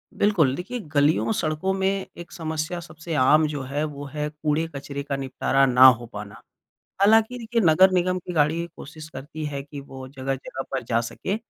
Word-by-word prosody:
बिल्कुल 170 -11 +3
देखिए, 240 - -5
गलियों-सड़कों 155 +3 +1
में 195 0 0
एक 170 - -10
समस्या 160 0 -3
सबसे 165 0 -8
आम 150 +4 +5
जो 150 -2 -4
है, 140 +3 -2
वो 145 -2 -5
है 150 +1 -3
कूड़े-कचरे 150 -2 -3
का 140 - -3
निपटारा 135 0 +1
ना 130 0 +6
हो 120 -2 +4
पाना। 100 -1 -8 0.6
हालाँकि 220 +4 +4
देखिए, 230 0 -1
नगर 185 +4 +6
निगम 185 0 +1
की 180 0 -7
गाड़ी 160 +2 +2
कोशिश 155 +2 -10
करती 150 +3 -7
है 140 -1 -4
कि, 145 0 -9
वो 135 -1 -10
जगह-जगह 135 0 -5
पर 135 -2 -2
जा 115 0 +1
सके, 190 - -4
155 Hz, 170 wpm, -24 LUFS, 135-175 Hz, 0.6 s, ना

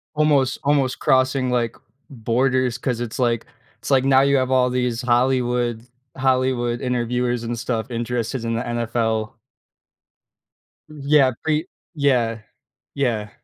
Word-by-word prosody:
Almost 145 -4 +2
almost 140 -2 +1
crossing, 130 0 +2
like, 120 -2 0 0.3
borders 125 0 0
'cause 125 -3 -2
it's 120 -2 -5
like 120 -3 0 0.3
it's - - -7
like 135 -1 +3
now 135 -1 +5
you 140 0 +3
have 130 0 0
all 125 -1 +3
these 125 -1 -1
Hollywood 120 -1 0 0.3
Hollywood 130 -2 0
interviewers 125 -1 -1
and 120 0 -3
stuff 115 -1 -3
interested 120 0 -3
in 115 - -1
the 115 - -1
NFL. 115 -2 -1 1.6
N 155 -1 -12
yeah. 140 -2 +4
Pre 155 +3 0 0.3
yeah. 125 -6 +1 0.6
Yeah. 115 -6 -1
125 Hz, 130 wpm, -21 LUFS, 120-130 Hz, 1.6 s, now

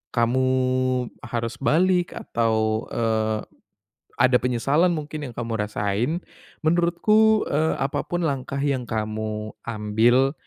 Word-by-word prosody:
kamu 125 +2 +2 0.8
harus 115 0 -3
balik 175 +5 +2
atau, 110 -1 0
eee, 110 -1 0 0.8
ada 130 0 +5
penyesalan 135 +8 +2
mungkin 155 -2 -4
yang - - -11
kamu 115 -1 -3
rasain 105 +4 -1 0.5
menurutku, 210 +7 +3
eee, 155 +2 +1
apa 135 0 -1
pun 175 -1 -2
langkah 140 -1 -2
yang 140 -3 0
kamu 110 0 -3
ambil, 115 +4 +2
125 Hz, 110 wpm, -24 LUFS, 110-155 Hz, 0.8 s, ada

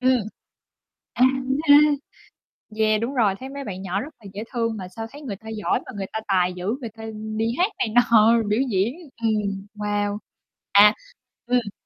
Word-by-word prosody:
Ừm. 255 +1 +4 1.0
À, 250 - +4
đúng 265 +1 -1
rồi - - -3
ha. 295 +1 +9 0.9
Yeah, 215 0 +2
đúng 250 +4 -2
rồi, 210 -5 +3
thấy 265 +1 -7
mấy 280 0 -6
bạn 190 -5 -6
nhỏ 195 +2 -2
rất 305 +2 -8
là 215 - -19
dễ 210 +2 -5
thương 230 -2 -1
mà 185 -2 -6
sao 225 +5 -7
thấy 290 +2 -11
người 230 -9 -5
ta 220 +2 -12
giỏi 215 -2 -1
mà - - -8
người 195 -1 -3
ta 220 - -1
tài 180 -2 +2
dữ, 180 0 -7 0.2
người 235 - -5
ta 220 +1 -12 0.3
đi 225 - +1
hát 375 +5 +2
này - - 0
nọ, 235 -1 +6
biểu 210 - +2
diễn, 205 +7 +1 0.3
ừm, 200 -3 0
wow. 205 0 -1 0.6
À, 210 +2 +8 0.5
ừm. 245 -5 0
220 Hz, 195 wpm, -23 LUFS, 200-245 Hz, 1.0 s, ha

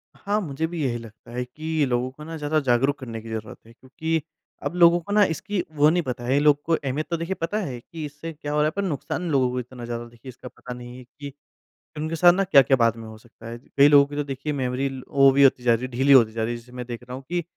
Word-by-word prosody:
हाँ, 205 +1 -1
मुझे 160 -2 -3
भी 165 -2 -4
यही 120 -3 -1
लगता 115 0 -13
है 125 +1 -3
कि 155 +4 -2
लोगों 125 0 -1
को 150 +3 -12
ना, 165 +1 -7
ज़्यादा 155 +1 0
जागरूक 135 +1 +1
करने 115 -4 -7
की 115 - -10
ज़रूरत 110 -1 -6
है, 115 - -16
क्योंकि 160 +6 -3 0.4
अब - - -3
लोगों 175 0 +6
को 175 +4 -9
ना, 210 0 +6
इसकी 185 +2 -2
वो 150 +1 +5
नहीं 175 +2 +1
पता 125 -3 -5
है। 135 +3 +2
लोगों 145 0 +4
को 165 - +1
अहमियत, 145 +1 -3
तो 170 - -1
देखिए, 165 +3 -3
पता 170 +6 -1
है 125 -4 -6
कि 155 +6 -8
इससे 150 +3 -7
क्या 145 -1 -6
हो 150 - 0
रहा 150 - +3
है, 155 - +1
पर 200 - -1
नुकसान 175 +1 -3
लोगों 130 -3 +2
को 125 - -2
इतना 125 0 -8
ज़्यादा, 120 0 -5
देखिए, 120 +2 -13
इसका 125 0 -11
पता 125 0 -9
नहीं 120 0 -10
है 130 - -11
कि 140 +3 -11 0.6
उनके 155 +2 -3
साथ 175 +2 +6
ना, 195 +2 +1
क्या-क्या 140 -7 +5
बाद 115 -2 +3
में 115 -1 -9
हो 110 0 -11
सकता 115 0 -15
है। 115 +1 -6 0.2
कई 140 +1 +8
लोगों 145 -1 +7
की, 145 - -8
तो 145 - -1
देखिए, 140 +2 -4
मेमोरी 130 0 -1 0.2
वो 135 -1 +5
भी 140 +1 +4
होती 130 -2 +4
जा 120 -1 +4
रही 115 +2 -1
है 130 - -8
ढीली 130 +3 +2
होती 115 -5 +6
जा 110 0 -3
रही 115 +2 -1
है। - - -4
जैसे 120 +1 -18
मैं 125 0 -7
देख 120 0 -7
रहा 125 +1 -8
हूँ 135 - -9
कि 175 0 -1
135 Hz, 285 wpm, -24 LUFS, 120-155 Hz, 0.6 s, कई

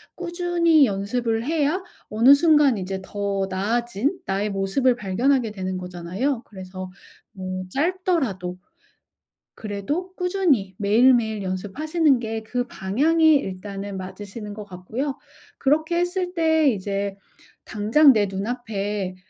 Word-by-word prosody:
꾸준히 345 -3 +3
연습을 225 +3 -1
해야 320 +4 0 0.3
어느 235 +6 +6
순간 295 -5 +4
이제 190 +1 -4
더 200 -1 -2
나아진 235 - -1
나의 195 +2 -1
모습을 200 +6 +1
발견하게 235 +3 +1
되는 185 -2 -4
거잖아요. 185 +9 -3
그래서 185 -2 -8 0.4
뭐 185 -1 -5
짧더라도 285 - -1 1.0
그래도 285 - -4
꾸준히 350 - +1
매일매일 220 0 +3
연습하시는 270 - 0
게 225 -1 -4
그 245 +2 -3
방향이 305 +12 +3
일단은 195 -3 -4
맞으시는 205 +3 -7
것 210 -1 -8
같고요. 220 +10 -4 0.4
그렇게 315 +5 +1
했을 360 +1 -1
때 320 -3 +3
이제 200 -2 -2 0.5
당장 225 +8 +4
내 210 -2 +2
눈앞에 205 -2 -3
225 Hz, 265 characters per minute, -23 LUFS, 195-295 Hz, 1.0 s, 어느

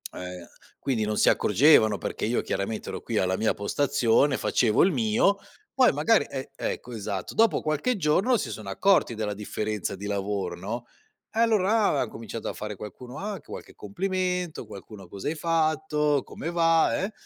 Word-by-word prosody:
Eh, 90 -1 -8 0.3
quindi 125 -6 -1
non 105 0 -1
si - - +5
accorgevano 110 -2 +5
perché - - -4
io 115 +3 +1
chiaramente 105 +3 -3
ero - - -5
qui - - -3
alla 95 0 +1
mia 110 +2 +1
postazione, 135 +3 +2
facevo 110 -4 +2
il 190 - +4
mio, 120 - +2 0.4
poi 255 -1 +5
magari 225 -2 +3
e 135 0 -6
ecco 125 - -4
esatto. 100 -4 -4
Dopo 225 -1 +3
qualche 155 - 0
giorno 195 +8 +2
si - - -3
sono 105 -3 -7
accorti 180 - +2
della 105 -1 -2
differenza 105 -1 -3
di 100 +2 -7
lavoro 100 0 -2
no, 115 +6 -5 0.5
e 220 - -2
allora 220 -1 +3
là 145 - +1
han - - -2
cominciato 115 0 -6
a - - -4
fare 105 0 -6
qualcuno: 120 +6 -9
"Ah!" 210 +2 -3
anche 195 - -10
qualche - - -9
complimento, 185 -5 -2
qualcuno: 100 -1 -11
"Cosa 95 +2 -7
hai 160 - -2
fatto, 155 -3 +1
come 165 - -6
va?", 165 +1 +3
eh 200 - -2
130 Hz, 175 wpm, -26 LUFS, 105-175 Hz, 0.5 s, si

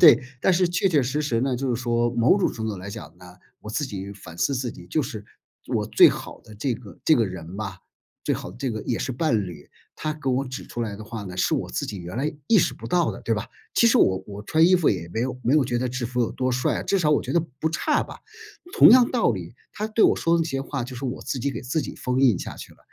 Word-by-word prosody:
对 160 -4 +9 0.2
但 190 - +3
是 180 0 +3
确 180 +2 +1
确 155 -6 +3
实 135 +5 -1
实 120 -6 0
呢， 130 0 0
就 125 0 -1
是 115 - -4
说 120 -1 +1
某 120 +8 +4
种 195 - +1
程 110 -1 -4
度 105 -2 -3
来 95 +2 -7
讲 105 -3 -9
呢， 90 0 -14 0.2
我 105 - -8
自 145 +6 -1
己 100 -3 -6
反 90 -4 -12
思 140 - +1
自 125 -2 -2
己 - - -13
就 155 - 0
是 110 -6 -5 0.4
我 - - 0
最 - - +7
好 - - -6
的 110 - -14
这 125 +4 -1
个 110 -4 -12
这 160 - +6
个 115 - +3
人 90 -1 -7
吧， 100 -3 -5 0.5
最 - - +1
好 - - -6
的 95 - -13
这 130 +1 -2
个 110 -1 -4
也 115 - -2
是 130 - -2
伴 120 - +1
侣， 85 -4 -11 0.2
她 155 - -3
给 150 -3 -5
我 130 +2 +1
指 130 0 -7
出 120 - -4
来 105 -3 -4
的 110 - -9
话 115 -1 -6
呢， 90 -2 -8
是 90 - +2
我 - - -2
自 - - -2
己 100 - -5
原 90 +3 -7
来 145 +5 -1
意 225 - +6
识 - - +2
不 - - -13
到 175 -2 +2
的 - - -9
对 115 - -1
吧？ 110 +1 -1 0.3
其 235 - +5
实 230 - +5
我 95 - +3
我 105 0 -8
穿 160 +9 +4
衣 185 - +5
服 175 -4 +4
也 85 -4 -3
没 110 - 0
有 125 +1 -2
没 125 - +3
有 150 -3 +4
觉 120 -1 -1
得 125 +1 -1
制 125 0 -3
服 125 +1 -2
有 120 - 0
多 130 0 -1
帅 125 0 0
啊， - - -4
至 195 - +1
少 160 -5 +2
我 150 - +3
觉 - - -4
得 170 - +4 0.2
不 160 - +1
差 170 - +1
吧。 - - -10 0.5
同 - - +8
样 245 0 +7
道 240 - +3
理， 95 -2 -5 0.2
她 210 - -3
对 220 0 +3
我 - - +5
说 165 0 +2
的 165 - +2
这 165 - -3
些 135 -2 -2
话 135 -1 -3
就 125 +1 -7
是 130 - -6
我 130 0 -4
自 135 - -3
己 140 +3 -1
给 - - -5
自 135 +6 -1
己 - - -6
封 125 +1 -1
印 125 -7 +5
下 - - -6
去 - - -10
了。 - - -23
125 Hz, 315 characters per minute, -24 LUFS, 105-150 Hz, 0.5 s, 对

